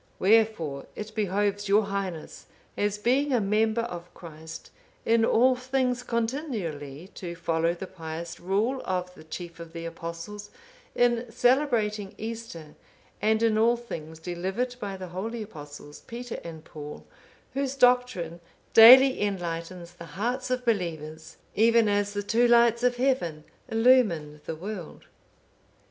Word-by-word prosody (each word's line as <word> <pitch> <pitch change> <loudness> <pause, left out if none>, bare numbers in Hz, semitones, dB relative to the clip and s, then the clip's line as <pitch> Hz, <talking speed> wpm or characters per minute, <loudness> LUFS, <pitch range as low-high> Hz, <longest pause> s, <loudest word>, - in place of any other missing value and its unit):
Wherefore 195 -9 +2
it 210 0 -7
behoves 205 0 -1
your 210 +2 +5
Highness, 195 -5 -5 0.3
as 205 0 0
being 260 +7 +1
a 250 - +3
member 215 +2 +1
of 175 -7 -7
Christ, 160 -1 -10 0.3
in 230 0 +3
all 255 +3 +4
things 250 -1 -1
continually 215 - -3
to 170 -2 -6
follow 165 0 0
the 185 - -6
pious 165 -2 -7
rule 210 +9 0
of 180 -1 -3
the 170 - -14
chief 170 +2 -8
of 165 -1 -10
the 165 0 -6
Apostles, 170 +5 -7 0.5
in 240 -1 +2
celebrating 225 -6 +1
Easter, 220 -9 -7 0.5
and 220 +1 +2
in 220 -1 +3
all 235 +2 +4
things 160 -9 -8
delivered 190 +9 -3
by 200 -3 -5
the 185 -1 -7
holy 220 +6 -4
Apostles, 145 -6 -11
Peter 240 0 -6
and 160 -2 -9
Paul, 150 -1 -9 0.5
whose 275 0 -2
doctrine 245 -10 +2 0.3
daily 255 +3 +9
enlightens 175 -3 -4
the 170 -1 -11
hearts 250 +5 -2
of 250 0 -1
believers, 160 -7 -3 0.2
even 230 +1 +4
as 205 0 +1
the 205 0 -2
two 235 +4 +3
lights 235 -1 +5
of 250 0 +2
heaven 245 - 0 0.3
illumine 220 -11 +3
the 160 - -4
world." 185 0 -7
205 Hz, 135 wpm, -27 LUFS, 170-235 Hz, 0.5 s, daily